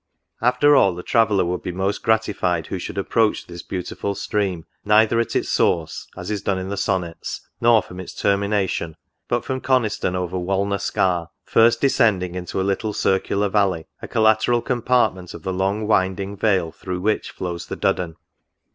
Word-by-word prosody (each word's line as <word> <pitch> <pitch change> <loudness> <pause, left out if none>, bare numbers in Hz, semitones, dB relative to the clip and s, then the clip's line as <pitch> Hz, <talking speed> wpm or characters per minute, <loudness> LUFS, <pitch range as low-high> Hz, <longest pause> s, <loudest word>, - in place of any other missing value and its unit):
After 125 +5 +4
all, 95 -9 +4
the 90 - -7
traveller 110 -5 +3
would 90 +1 -2
be 90 - -4
most 95 +3 -2
gratified 100 -7 +1
who 95 - -4
should 95 - -6
approach 105 +2 +1
this 85 -1 -9
beautiful 100 +2 -4
Stream, 95 -6 -2 0.2
neither 110 +2 +4
at 115 - -1
its - - 0
source, 80 -2 0
as - - -5
is 105 -2 -2
done 100 -1 0
in 95 0 -4
the 100 - -2
Sonnets, 95 -4 -3
nor 115 -2 +5
from 90 - -10
its 95 - -8
termination; 100 -5 0 0.3
but 120 0 -1
from 130 -1 -3
Coniston 110 -8 +1
over 90 0 -2
Walna 100 +2 0
Scar; 90 -4 0
first 115 +1 +4
descending 105 -10 +2
into 90 +1 -4
a - - +1
Httle 100 +2 -1
circular 100 +1 +1
valley, 95 -5 +1 0.2
a - - -6
collateral 110 +1 +3
compartment 120 -7 0
of - - -10
the 95 - -2
long 100 +3 0
winding 95 -1 0
vale 95 -5 +1
through 90 +1 -5
which 105 +2 0
flows 85 -2 -5
the - - -5
Duddon. 85 -3 0
100 Hz, 175 wpm, -22 LUFS, 90-110 Hz, 0.3 s, nor